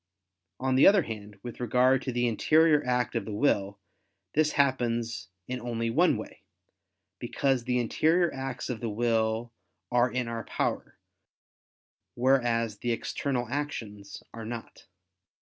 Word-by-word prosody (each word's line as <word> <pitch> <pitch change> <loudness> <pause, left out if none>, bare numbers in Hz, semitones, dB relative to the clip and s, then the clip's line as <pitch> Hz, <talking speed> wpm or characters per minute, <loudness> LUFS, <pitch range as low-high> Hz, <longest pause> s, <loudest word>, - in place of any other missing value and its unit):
On 130 0 0
the 130 - +6
other 195 -3 +6
hand, 105 -4 -8
with 120 - -8
regard 125 +2 +3
to 130 - -3
the 120 0 +1
interior 150 +6 +4
act 125 0 0
of 115 - 0
the 110 - -6
will, 100 -5 +1 0.6
this 155 0 +2
happens 120 -7 0 0.2
in 125 -1 -4
only 115 -1 -2
one - - +3
way: - - -9 0.8
because 135 -4 0
the 125 -1 +1
interior 165 +8 +2
acts 135 -1 -5
of 120 -3 -4
the 115 - -3
will 115 +1 0 0.4
are 125 +1 +3
in 125 -1 -2
our 115 -1 -4
power, - - -3 1.2
whereas 120 -4 +1
the 120 - -1
external 125 +2 -2
actions 110 -9 -5
are 115 - -7
not. 115 +1 -8
120 Hz, 140 wpm, -28 LUFS, 115-130 Hz, 1.2 s, the